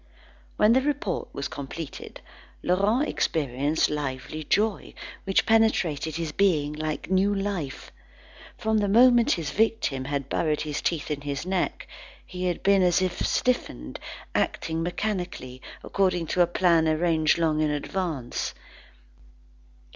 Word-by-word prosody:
When 210 +2 +5
the 260 - +4
report 280 -10 -2
was 140 - -4
completed, 145 +2 -8 0.4
Laurent 205 +10 +2
experienced 145 0 0
lively 145 +1 -4
joy, 210 +6 0 0.3
which 195 0 +2
penetrated 180 -9 +2
his 165 -2 -3
being 150 -5 +2
like 155 +3 -4
new 195 +2 +3
life. 195 -9 -4 0.7
From 220 0 +1
the 205 - +1
moment 240 +3 +5
his 160 -5 -3
victim 210 -11 0
had 140 -1 -2
buried 155 +1 0
his 150 -1 -3
teeth 160 -3 -1
in 145 -1 -2
his 145 +2 -4
neck, 185 -1 -1 0.4
he 180 0 -5
had 175 -2 -2
been 200 -1 +4
as 180 -1 +4
if 185 -1 -1
stiffened, 65 - -1 0.3
acting 160 0 -1
mechanically, 175 -8 -3 0.2
according 185 -3 +1
to 180 - +3
a 175 - +5
plan 170 -2 +3
arranged 160 -1 +2
long 155 -2 +1
in 155 - +2
advance. 150 -3 -3
170 Hz, 130 wpm, -26 LUFS, 150-195 Hz, 0.7 s, When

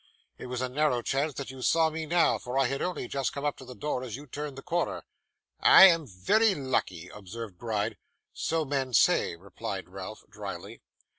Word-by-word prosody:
'It - - -7
was 125 0 -3
a 130 - 0
narrow 125 -2 +1
chance 140 +4 -1
that 140 -1 -5
you 130 -1 -10
saw 160 +3 +3
me 160 0 -4
now, 170 +1 +3
for 125 +2 -4
I 135 - +4
had 135 +2 -2
only 180 -8 -2
just 135 0 -1
come 140 +1 -4
up 145 - 0
to 130 - -11
the 125 0 -10
door 145 -2 -2
as 120 -4 -5
you 145 +3 -9
turned 145 0 -6
the 135 - -8
corner.' 175 +1 -1 0.6
'I - - +9
am 165 -4 +1
very 190 - +2
lucky,' 95 - -2
observed 105 -1 -9
Gride. 110 -2 -2 0.4
'So 160 -1 -1
men 135 -3 -1
say,' 85 - +4
replied 95 +2 -6
Ralph, - - -8
drily. - - -8
135 Hz, 200 wpm, -28 LUFS, 115-150 Hz, 0.6 s, I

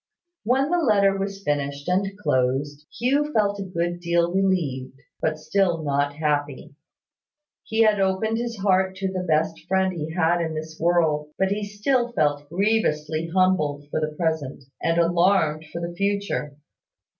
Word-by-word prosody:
When 265 +7 +1
the 355 - +3
letter 200 -9 +3
was 195 0 -4
finished 140 -2 -2
and 195 +2 0
closed, 145 -3 -1
Hugh 280 +5 +1
felt 205 -2 +1
a - - -2
good 175 -1 -2
deal 170 0 +1
relieved: 155 -10 -1 0.2
but 155 -1 0
still 165 +1 0
not 145 0 0
happy. 145 -3 -2 0.9
He 220 +1 +2
had 215 -2 +3
opened 195 +4 +1
his 235 -1 -4
heart 190 -1 +2
to 190 0 -2
the 185 - -2
best 160 -1 0
friend 190 0 +1
he 160 -2 -4
had 175 0 +2
in 160 -1 -2
this 155 0 -7
world: 160 -3 +2
but 190 0 +1
he 210 +1 -1
still 240 +4 0
felt 145 -5 0
grievously 165 -5 0
humbled 165 -5 +1
for - - 0
the 155 0 -2
present, 160 -5 -2 0.2
and 165 0 +1
alarmed 170 -2 +2
for 170 - -5
the 170 0 -4
future. 200 -6 -2
175 Hz, 155 wpm, -24 LUFS, 155-200 Hz, 0.9 s, the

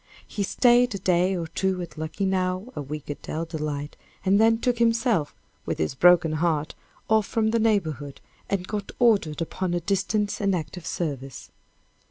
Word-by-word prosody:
He 205 - -4
staid 245 +3 +3
a - - -1
day 185 0 +2
or 170 - -3
two 185 +3 -1
at 170 - -10
Luckenough, 185 +6 -2
a - - -3
week 150 +1 -6
at 145 - -8
Dell 160 +2 -4
Delight, 150 -3 -4 0.3
and 195 +2 +4
then 225 0 +5
took 240 +1 0
himself, 230 - +2 0.3
with - - -1
his 80 - -1
broken 175 +3 +5
heart, 155 -1 0 0.3
off 220 -1 +3
from 220 -1 +1
the 230 - +2
neighborhood, 160 - 0 0.3
and 190 -2 -1
got 205 -2 -4
ordered 195 - +2
upon 175 +1 -3
a - - +1
distant 200 +4 -1
and 200 -2 +2
active 165 +1 -5
service. 135 -6 -4
185 Hz, 170 wpm, -25 LUFS, 155-210 Hz, 0.3 s, then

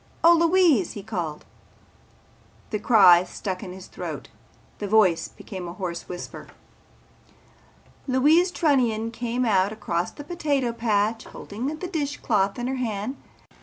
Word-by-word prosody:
Oh, 335 +1 +8
Louise!" 335 - +3
he 205 - -8
called. 175 -8 -4 1.3
The 210 - -1
cry 180 -6 +6
stuck 185 0 -5
in 185 - -7
his 185 0 -10
throat. - - -7 0.5
His 205 - -4
voice 185 -6 +3
became 185 -4 -8
a 170 - -6
hoarse 175 -2 -5
whisper. 175 -1 -7 1.6
Louise 300 +8 +4
Trunnion 245 -10 +1
came 240 +1 -2
out 195 -3 +2
across 180 -5 -2
the 290 - -10
potato 290 -6 -1
patch 220 -1 0
holding 220 +6 -6
the 310 +5 -4
dish 295 -5 -3
cloth 200 -5 0
in 240 - -3
her 260 +1 -2
hand. 225 0 -3
225 Hz, 135 wpm, -24 LUFS, 190-275 Hz, 1.6 s, Oh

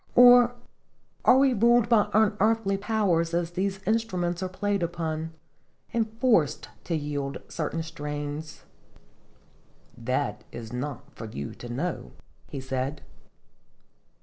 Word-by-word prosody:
" - - -32
Or 245 0 +8 0.7
are 255 - +7
we 270 -1 +4
ruled 235 +1 +4
by 225 -3 +4
unearthly 215 -1 +2
powers, 195 -6 +1
as 170 0 -1
these 190 +2 -2
instruments 185 -5 0
are 185 - -2
played 200 +1 -1
upon" 165 -2 -2 0.6
and 225 -2 0
forced 170 - +2 0.2
to 170 - -1
yield 145 -2 -3
certain 165 +1 -3
strains? 150 -1 -6 0.5
" - - -33
" - - -33
That 115 -3 -2
is 115 -1 -8
not 135 +2 -5
for 115 - -7
you 70 -10 -6
to 120 - -10
know," 145 +8 -3 0.4
he 140 - -5
said. 130 +2 -3
170 Hz, 130 wpm, -27 LUFS, 145-215 Hz, 0.7 s, Or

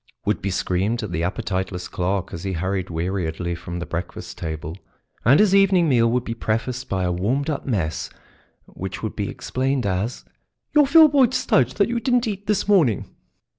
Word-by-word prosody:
would 105 - 0
be 100 - -2
screamed 95 +5 -1
at 105 - -5
the 85 - -2
appetiteless 95 -1 -3
clerk 95 +1 -2
as 85 - -6
he 95 -1 -2
hurried 95 +2 -2
weariedly 85 0 -2
from 85 +1 -6
the 90 - -4
breakfast 85 +1 -6
table, 80 0 -5 0.5
and 135 +6 +5
his 210 -2 +4
evening 195 -3 +5
meal 115 -5 +4
would 125 +1 +1
be 115 - -4
prefaced 115 +3 -2
by 95 -1 -1
a 90 - 0
warmed 125 - 0
up 145 - -5
mess 90 -11 -1 0.6
which 95 +2 -7
would 110 - -3
be 100 -2 -2
explained 130 -1 -2
as 100 +5 -2 0.5
"your 295 -2 +5
Filboid 285 -5 +6
Studge 130 - +2
that 200 - +3
you 235 0 -1
didn't 245 0 +1
eat 205 -1 -5
this 210 -1 +1
morning." 165 - +2
105 Hz, 180 wpm, -22 LUFS, 90-145 Hz, 0.6 s, Filboid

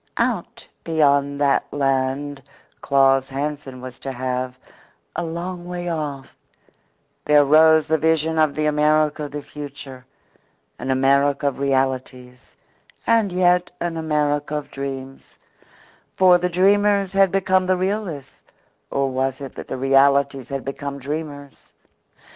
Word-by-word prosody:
Out - - -2 0.2
beyond 140 -3 +2
that 140 -1 +1
land 135 0 -1 0.4
Claus 135 -1 +3
Hansen 140 -2 -5
was 130 -1 -9
to 135 - -5
have, 130 0 -3 0.6
a 175 - -2
long 175 +2 -5
way 175 0 -4
off, 145 -5 -5 0.9
there 150 -1 +5
rose 160 +1 +5
the 160 0 +1
vision 160 0 +1
of 155 -2 +2
the 155 - -1
America 150 0 +2
of 145 - -8
the 145 0 -6
future 140 -3 -9 0.8
an - - -5
America 140 +2 +2
of 135 - -10
realities, 130 -2 -2 0.5
and 225 -4 +2
yet 180 0 +2
an 170 -1 -3
America 150 -2 -1
of 150 -1 -5
dreams; 135 -1 -7 0.8
for 180 -1 +5
the 180 +1 -1
dreamers 200 +2 +3
had 195 -2 +3
become 185 -1 +1
the 185 0 +2
realists 185 -7 -4 0.5
or 140 0 0
was 130 0 -1
it 135 -2 -8
that - - -9
the - - -4
realists 135 0 +2
had 135 -1 -4
become 140 +1 -5
dreamers? 145 0 -7
145 Hz, 130 wpm, -21 LUFS, 135-160 Hz, 0.9 s, there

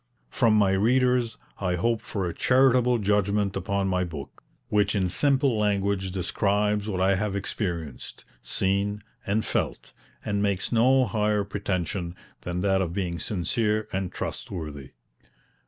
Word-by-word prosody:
From 115 -4 +3
my 100 -2 +4
readers 120 +3 +2 0.2
I 90 -2 0
hope 115 +5 0
for 100 -4 -3
a 85 - -3
charitable 125 -1 +4
judgment 105 -1 +1
upon 95 +1 -1
my 90 -1 +1
book, 75 -6 -8 0.3
which 105 -1 +2
in 95 -2 +1
simple 135 +3 +2
language 100 -2 0
describes 105 +3 0
what 95 -3 -2
I 95 +1 +3
have 100 +1 -1
experienced, 85 - -4 0.2
seen 100 +2 -1 0.2
and 105 +2 +1
felt, - - -2 0.3
and 100 -1 0
makes 100 -2 0
no 130 +3 +4
higher 105 -2 +1
pretension 95 -3 -3 0.3
than 90 0 -3
that 95 0 +2
of 85 -3 -2
being 90 -3 -2
sincere 105 +4 0
and 95 -1 -2
trustworthy. 75 -7 -6
100 Hz, 140 wpm, -26 LUFS, 95-105 Hz, 0.3 s, my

